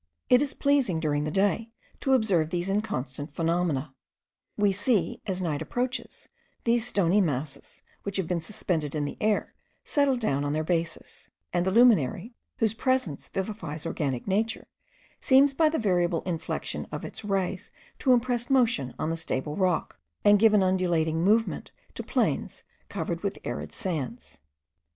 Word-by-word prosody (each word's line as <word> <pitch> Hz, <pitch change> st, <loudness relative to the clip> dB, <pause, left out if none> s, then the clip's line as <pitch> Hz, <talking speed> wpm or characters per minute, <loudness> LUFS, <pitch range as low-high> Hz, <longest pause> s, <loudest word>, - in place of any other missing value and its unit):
It 250 Hz, +1 st, +6 dB
is 290 Hz, -2 st, -1 dB
pleasing, 275 Hz, -, +2 dB
during 150 Hz, -2 st, 0 dB
the -, -, -1 dB
day, 205 Hz, +6 st, +1 dB, 0.3 s
to 270 Hz, -, +1 dB
observe 195 Hz, -11 st, +2 dB
these 175 Hz, +2 st, -2 dB
inconstant 145 Hz, -8 st, -3 dB
phenomena; 165 Hz, -5 st, 0 dB, 0.6 s
we 205 Hz, -1 st, +3 dB
see, 200 Hz, -2 st, 0 dB
as 190 Hz, -1 st, -2 dB
night 155 Hz, -4 st, -1 dB
approaches, 250 Hz, +1 st, -3 dB, 0.4 s
these 235 Hz, 0 st, +2 dB
stony 200 Hz, -3 st, +3 dB
masses 145 Hz, -4 st, -3 dB, 0.2 s
which 200 Hz, -1 st, -3 dB
had 190 Hz, -, 0 dB
been 175 Hz, -1 st, -1 dB
suspended 160 Hz, -6 st, -2 dB
in 150 Hz, -1 st, 0 dB
the -, -, -5 dB
air, 215 Hz, -1 st, +1 dB, 0.3 s
settle 285 Hz, -3 st, +2 dB
down 145 Hz, -, 0 dB
on 145 Hz, 0 st, -1 dB
their 155 Hz, +1 st, 0 dB
bases; 165 Hz, 0 st, -3 dB, 0.2 s
and 175 Hz, +1 st, +1 dB
the -, -, +2 dB
luminary, 225 Hz, -, +4 dB, 0.2 s
whose 220 Hz, -2 st, +1 dB
presence 255 Hz, -, -1 dB
vivifies 185 Hz, -6 st, -4 dB
organic 140 Hz, -6 st, -2 dB
nature, 220 Hz, +4 st, 0 dB, 0.5 s
seems 275 Hz, +1 st, +5 dB
by 315 Hz, +2 st, +4 dB
the 320 Hz, -, -1 dB
variable 175 Hz, -, +1 dB
inflection 170 Hz, -3 st, -3 dB
of -, -, -5 dB
its -, -, -7 dB
rays 195 Hz, -1 st, -2 dB, 0.3 s
to 260 Hz, -, +3 dB
impress 245 Hz, -1 st, +2 dB
motion 230 Hz, -, +2 dB
on 155 Hz, -, -1 dB
the -, -, -1 dB
stable 150 Hz, -2 st, -2 dB
rock, 180 Hz, -, 0 dB, 0.3 s
and 205 Hz, 0 st, +7 dB
give 220 Hz, 0 st, +5 dB
an 200 Hz, -, +5 dB
undulating 170 Hz, -3 st, +1 dB
movement 220 Hz, +4 st, +1 dB, 0.2 s
to -, -, -5 dB
plains -, -, -1 dB, 0.3 s
covered -, -, -3 dB
with -, -, -2 dB
arid -, -, -5 dB
sands. 155 Hz, -, -5 dB
190 Hz, 155 wpm, -27 LUFS, 160-225 Hz, 0.6 s, and